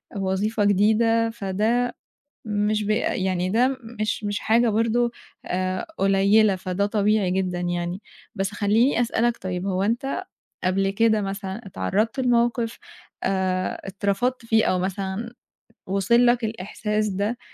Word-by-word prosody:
وظيفة 200 +3 0
جديدة، 225 +3 +3
فده 225 +4 -1 0.5
مش 210 0 0
بي 215 - +1
يعني 185 -1 -1
ده 250 +6 +2 0.2
مش 215 0 -1
مش 205 0 -1
حاجة 230 +1 +3
برضه 230 +2 +2 0.3
آآ 185 - -2
قليّلة، 195 +1 +4
فده 185 +2 -1
طبيعي 210 -2 +1
جدًا 180 -1 -1
يعني. 175 +2 -2 0.3
بس 195 -1 -1
خلّيني 220 +6 +2
أسألك 235 0 +1
طيب 185 0 -4
هو 190 -1 0
أنت 235 +7 -1 0.4
قبل 195 +1 +1
كده 220 0 +2
مثلًا 195 +2 -5
اتعرَّضت 215 +6 -1
لموقِف 235 -2 +1 0.4
آآ 185 -1 -1
اترفضت 205 +6 -1
فيه 220 -1 +3
أو 185 - +1
مثلًا 195 +5 -3 0.5
وصل 235 +6 +3
لك 240 -1 +3
الإحساس 215 0 -2
ده 205 +5 -2
205 Hz, 125 wpm, -24 LUFS, 190-230 Hz, 0.5 s, قليّلة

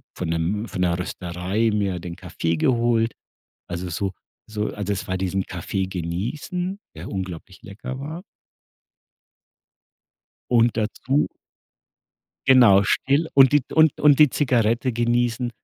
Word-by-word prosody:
von 90 - -4
'nem 90 +7 -1
von - - -6
'ner 85 -1 +1
Rösterei 90 +5 -2
mir 100 -4 -1
den 85 0 -7
Kaffee 85 0 -2
geholt. 115 +1 +2 0.6
Also, 90 +1 -4
so 95 +3 -2 0.4
so 105 -1 -2
also 105 0 -3
es 100 - -4
war 95 - -1
diesen 95 0 -1
Kaffee 95 +2 -3
genießen, 120 - -4 0.2
der - - -7
unglaublich 95 -2 -6
lecker 110 +6 -7
war. 155 +6 -6 2.3
Und 120 -2 +3
dazu 125 +6 0 1.2
Genau 120 -7 +7
still 140 +8 +1
und 135 -1 +7
die 145 - +5
d 130 - -11
und 155 -2 +4
und 145 -1 +5
die 150 -3 +7
Zigarette 120 -2 +1
genießen. 120 +1 0
110 Hz, 130 wpm, -23 LUFS, 95-130 Hz, 2.3 s, Genau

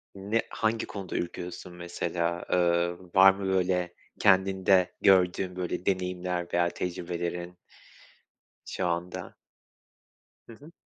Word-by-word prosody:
Ne 105 +4 0
hangi 110 +1 -1
konuda 95 -3 -6
ürküyorsun 90 +1 -5
mesela? 85 0 -3
Eee, 85 -1 +3 0.2
var 95 0 +9
mı 100 0 -6
böyle 90 -2 0 0.3
kendinde 95 -1 +4
gördüğün 90 -1 +3
böyle 90 0 -3
deneyimler 90 -2 -1
veya 85 0 +3
tecrübelerin 85 0 -4 1.1
şu - - -3
anda? 85 +1 -4 1.1
Hı 115 - -11
hı. 145 +7 -15
90 Hz, 105 wpm, -28 LUFS, 85-95 Hz, 1.1 s, var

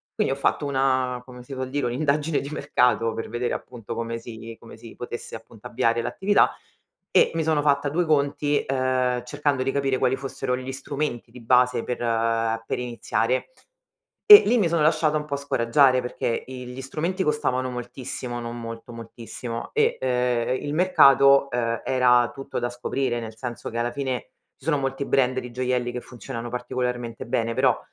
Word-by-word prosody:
Quindi - - +1
ho 135 - -6
fatto 145 - 0
una 130 -2 0
come 125 -1 -11
si 135 - -9
vuol 130 -1 -4
dire, 140 -2 -1
un'indagine 145 +4 0
di 140 - -6
mercato 125 -6 +1
per 115 - -5
vedere 120 +1 -2
appunto 120 -5 -7
come 115 0 -3
si 115 -1 -9
come 115 -1 -13
si 115 0 -12
potesse, 120 -1 -7
appunto, 110 -1 -11
avviare 115 -1 +1
l'attività 190 - +2 0.6
e - - +4
mi 165 - 0
sono 155 -2 +2
fatta 145 0 +2
due 170 +4 0
conti, 145 -1 +1
uhm, 130 -2 0
cercando 145 +1 -1
di 135 - 0
capire 135 -1 0
quali 130 0 +2
fossero 135 -1 -3
gli 130 +1 -5
strumenti 135 -3 -4
di 125 0 -12
base 125 0 +3
per 125 -1 -4
ehm, 115 -1 0
per - - -2
iniziare 120 0 -1 0.8
e 415 -1 +12
lì 240 +4 +3
mi 185 - +3
sono 165 -2 +1
lasciata 155 0 +3
un 150 - -4
po' 145 -1 -3
scoraggiare 130 -1 +3
perché 125 -1 -2
i 125 -1 -8
gli 125 +2 -7
strumenti 170 +8 -2
costavano 135 -5 0
moltissimo, 125 0 -5
non 120 0 -6
molto, 115 +1 -8
moltissimo, 115 +1 -7
e - - +2
uhm, 130 - -1
e 125 0 +1
il 145 - -4
mercato, 140 -6 +5
uhm, 115 -2 -1
era 125 -2 +4
tutto 135 +2 -5
da 120 - -1
scoprire, 120 0 -2
nel 110 -1 -7
senso 120 +1 -6
che 115 - -5
alla 120 +1 0
fine 130 -2 -3 0.3
ci - - -17
sono 155 -3 +2
molti 135 0 -2
brand 130 -1 +2
di 125 -1 -8
gioielli 125 0 -1
che 125 0 -5
funzionano 120 -1 -7
particolarmente 125 -1 -3
bene, 115 -2 0
però, - - +3
125 Hz, 185 wpm, -24 LUFS, 120-140 Hz, 0.8 s, e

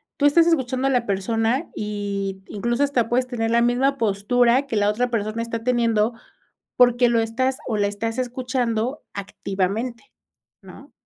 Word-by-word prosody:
tú 285 - 0
estás 330 +3 +5
escuchando 265 -5 +1
a - - +2
la 245 -3 +1
persona 225 - 0
y 200 -2 -4
incluso 235 +6 -1
hasta 250 -5 +1
puedes 250 +1 +1
tener 225 -3 -2
la 235 0 +4
misma 255 +3 +2
postura 235 +4 +2
que 235 -5 -3
la 205 0 +3
otra 245 +4 0
persona 215 0 -2
está 230 -1 -4
teniendo, 230 -2 +1 0.6
porque 245 0 +5
lo 235 -1 +2
estás, 255 +4 -1
o 220 - 0
la 205 -1 +1
estás 225 +4 -3
escuchando 250 0 -2
activamente, 200 - -3 0.5
¿no? - - -14
235 Hz, 155 wpm, -22 LUFS, 215-255 Hz, 0.6 s, estás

